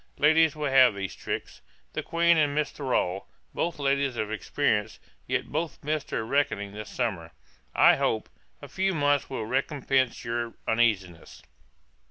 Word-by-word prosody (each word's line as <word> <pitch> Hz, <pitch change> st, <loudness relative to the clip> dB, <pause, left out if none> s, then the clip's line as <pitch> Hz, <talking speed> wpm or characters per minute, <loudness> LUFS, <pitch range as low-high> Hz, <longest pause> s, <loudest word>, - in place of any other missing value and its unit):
Ladies 155 Hz, +1 st, +4 dB
will 150 Hz, -2 st, -2 dB
have 130 Hz, -5 st, +6 dB
these 100 Hz, -1 st, -4 dB
tricks. -, -, -6 dB, 0.3 s
The -, -, -2 dB
Queen 170 Hz, 0 st, +3 dB
and 150 Hz, -2 st, +1 dB
Mrs. 150 Hz, -2 st, 0 dB
Thrale, 100 Hz, -9 st, -1 dB, 0.3 s
both 170 Hz, -1 st, -2 dB
ladies 140 Hz, -2 st, 0 dB
of 110 Hz, 0 st, -2 dB
experience, 110 Hz, -1 st, -1 dB, 0.3 s
yet -, -, -2 dB
both 160 Hz, 0 st, -3 dB
missed 150 Hz, 0 st, -2 dB
their 110 Hz, -, -2 dB
reckoning 110 Hz, -6 st, 0 dB
this 105 Hz, +1 st, -8 dB
summer. 95 Hz, -10 st, -3 dB, 0.4 s
I -, -, +6 dB
hope, -, -, 0 dB, 0.4 s
a -, -, -7 dB
few 190 Hz, -1 st, -1 dB
months 145 Hz, -2 st, +1 dB
will 120 Hz, -5 st, -4 dB
recompence 130 Hz, 0 st, 0 dB
your 115 Hz, 0 st, -3 dB
uneasiness. 100 Hz, -7 st, 0 dB
135 Hz, 150 wpm, -27 LUFS, 110-150 Hz, 0.4 s, have